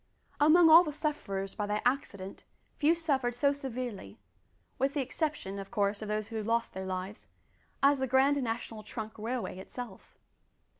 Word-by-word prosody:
Among 325 +3 +7
all 325 +2 +9
the 305 - -3
sufferers 240 -11 -3
by 210 -1 -3
that 210 +1 -1
accident 200 -7 -2 0.4
few 315 +3 +4
suffered 270 -7 0
so 280 +3 +3
severely 250 - -6 0.6
with 275 +3 +1
the 285 - +1
exception: 265 - -3
of 195 - -7
course, 205 -2 0
of 215 - -5
those 215 0 -2
who 225 -2 -3
lost 230 +2 0
their 190 0 -5
lives 185 +2 -5 0.6
as 280 0 +5
the 265 - 0
Grand 270 +2 +3
National 225 -2 -4
Trunk 215 0 -6
Railway 230 -3 -3
itself. 215 0 -9
240 Hz, 160 wpm, -31 LUFS, 205-280 Hz, 0.6 s, all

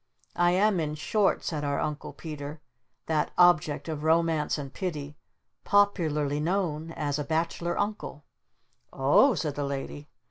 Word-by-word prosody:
"I 175 0 +4
am 195 0 +3
in 150 -1 -2
short," 195 +7 +1
said 150 -3 -3
our 140 -1 -1
Uncle 150 -1 -3
Peter, 150 -1 -7 0.5
"that 155 -2 0
object 155 -4 +4
of 155 -2 -4
Romance 160 -1 +2
and 140 -2 -7
Pity 150 -6 -4 0.5
popularly 155 -8 +2
known 165 -2 -1
as 150 -2 -2
a - - -1
'Bachelor 165 +2 -1
Uncle.'" 205 -8 -3 0.7
"O 145 - +4
h," - - -2
said 150 -4 -2
the 145 - -3
Lady. 140 +1 -5
155 Hz, 145 wpm, -27 LUFS, 145-175 Hz, 0.7 s, I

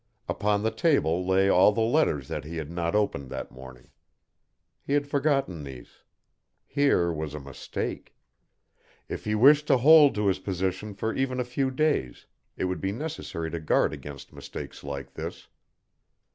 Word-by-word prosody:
Upon 105 0 0
the 110 - +1
table 100 - +1
lay 95 +1 +3
all 95 +1 +6
the 115 - -3
letters 110 - +1
that 75 - -4
he 80 +3 -7
had 80 -1 -5
not 85 +2 -2
opened 85 -11 0
that - - -6
morning. 65 -1 -13 0.9
He 140 - -3
had 145 0 +2
forgotten 140 - 0
these. 65 -3 -11 0.6
Here 135 - +2
was 75 -1 -4
a - - -5
mistake. 70 -2 -6 0.9
If - - -6
he 105 0 0
wished 145 +6 +6
to - - +5
hold 145 +1 +7
to 105 0 0
his 95 -2 +2
position 95 +2 -3
for 110 +3 -2
even 130 -1 -1
a - - +1
few 130 +2 -1
days, 130 - -1 0.3
it - - -2
would 90 0 -3
be 95 - -1
necessary 115 - -5
to 85 - -3
guard 75 - +2
against 70 -2 -9
mistakes - - -8
like 70 -1 -6
this. - - -7
100 Hz, 165 wpm, -27 LUFS, 80-135 Hz, 0.9 s, hold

